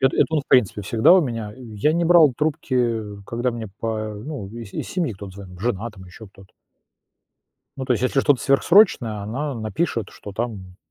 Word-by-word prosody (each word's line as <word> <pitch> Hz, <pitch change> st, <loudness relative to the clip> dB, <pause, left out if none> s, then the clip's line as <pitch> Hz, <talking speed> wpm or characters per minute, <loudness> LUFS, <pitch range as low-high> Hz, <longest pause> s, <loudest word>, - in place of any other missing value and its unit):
Это 135 Hz, 0 st, +2 dB
это -, -, +4 dB
он 150 Hz, -, +2 dB
в 140 Hz, -, -15 dB
принципе 105 Hz, -4 st, +3 dB
всегда 110 Hz, -, +4 dB
у 185 Hz, -, +7 dB
меня, 115 Hz, -6 st, -4 dB
и 130 Hz, -, -13 dB
я 150 Hz, +10 st, +2 dB
не 170 Hz, +1 st, +1 dB
брал 165 Hz, -4 st, +6 dB
трубки 130 Hz, -6 st, 0 dB, 0.2 s
когда 120 Hz, +4 st, -2 dB
мне 115 Hz, -2 st, -6 dB
па 110 Hz, -1 st, -3 dB
ну, 110 Hz, -1 st, -7 dB
из 115 Hz, -1 st, -9 dB
из -, -, -5 dB
семьи 175 Hz, -9 st, -1 dB
кто-то 100 Hz, 0 st, -9 dB
звонил 95 Hz, -2 st, -11 dB
жена, 115 Hz, 0 st, -2 dB
там 95 Hz, -3 st, -14 dB
ещё 95 Hz, +5 st, -12 dB
кто-то 95 Hz, -1 st, -18 dB, 1.2 s
ну, 130 Hz, -, -4 dB
то 125 Hz, -, +2 dB
есть, 120 Hz, -, -3 dB
если 130 Hz, +1 st, +2 dB
что-то 145 Hz, -3 st, +2 dB
сверхсрочное, 135 Hz, -, +4 dB
она 135 Hz, +8 st, -3 dB
напишет, 110 Hz, -, -2 dB
что 105 Hz, -, -10 dB
там, 100 Hz, -5 st, -5 dB
115 Hz, 200 wpm, -22 LUFS, 105-135 Hz, 1.2 s, у